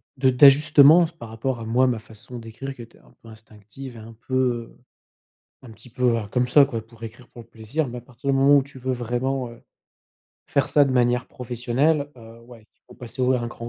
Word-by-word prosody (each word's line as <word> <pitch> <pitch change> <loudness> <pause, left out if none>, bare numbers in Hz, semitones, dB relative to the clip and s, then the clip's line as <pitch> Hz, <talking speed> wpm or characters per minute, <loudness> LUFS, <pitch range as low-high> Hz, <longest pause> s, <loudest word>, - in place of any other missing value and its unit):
de 130 0 +2
d'ajustements 145 +5 +6
par 115 - -9
rapport 120 +2 -4
à 115 - -7
moi 120 +3 +2
ma 120 -3 -1
façon 110 +3 -12
d'écrire 115 +5 -8
qui 125 - -12
était 115 - -14
un - - -24
peu - - -17
instinctive 110 +3 -13
et - - -10
un 110 +1 -12
peu, 130 - -2
heu, 120 -3 -1 0.8
un 125 - -14
petit 110 +3 -16
peu, 125 -2 +1
heu, 105 - -5
comme 125 -1 0
ça 140 +3 +6
quoi 115 -5 -5
pour 115 0 -18
écrire 115 +2 -10
pour 120 - -13
le - - -26
plaisir. 115 +6 -4
Mais 125 0 -7
à - - -16
partir 130 +3 -5
du - - +1
moment 140 +2 +5
où 140 - +1
tu 135 -1 -14
veux 130 +1 -3
vraiment, 125 +2 -2
heu, 115 - -15 0.9
faire 140 - 0
ça 145 -1 +4
de 135 - -2
manière 125 0 +1
professionnelle, 125 +5 -1
heu, 115 0 -14
ouais, 115 -2 -16
il - - -46
faut - - -16
passer 120 +1 -7
au 125 +1 +3
un 120 -2 -2
cran 120 0 -9
125 Hz, 230 wpm, -23 LUFS, 115-135 Hz, 0.9 s, d'ajustements